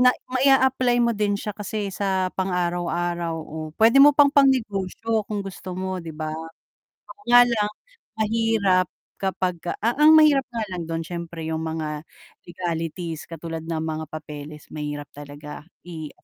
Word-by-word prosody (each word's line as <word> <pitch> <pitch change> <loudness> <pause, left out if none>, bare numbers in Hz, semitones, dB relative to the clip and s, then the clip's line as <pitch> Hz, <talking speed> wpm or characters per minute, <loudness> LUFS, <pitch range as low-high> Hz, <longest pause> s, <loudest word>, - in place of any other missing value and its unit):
na 250 0 +7 0.2
mai-a-apply 260 -2 +4
mo 235 0 +3
din 205 -1 +1
siya 210 +1 -4
kasi 205 -1 -4
sa 190 -1 -1
pang 190 0 -2
araw-araw 175 -1 -1
o 160 -1 -8 0.2
pwede 230 +5 +6
mo 290 +1 +9
pang 285 -1 +6
pangnegosyo 225 -5 +2
kung 210 -1 -2
gusto 185 -1 -7
mo 185 0 -3
'di 165 -2 -8
ba. 155 -1 -3 0.9
Kaya 245 0 +8
lang, 210 -3 0 0.5
mahirap 215 -4 +2 0.3
kapag 185 -2 -1 0.3
a 230 +2 +1
ang 310 +1 +8
mahirap 290 -4 +5
nga 230 -2 -3
lang 175 -2 -4
dun 165 0 -2
syempre 170 -1 -6
yung 160 - -1
mga 155 -1 -4 0.4
legalities 165 -1 -4
katulad 165 0 -6
ng 160 -1 -2
mga 160 0 -3
papeles 150 -1 -8
mahirap 145 -1 -5
talaga 145 +1 -9 0.2
i 160 -3 -6
185 Hz, 150 wpm, -24 LUFS, 160-225 Hz, 0.9 s, mo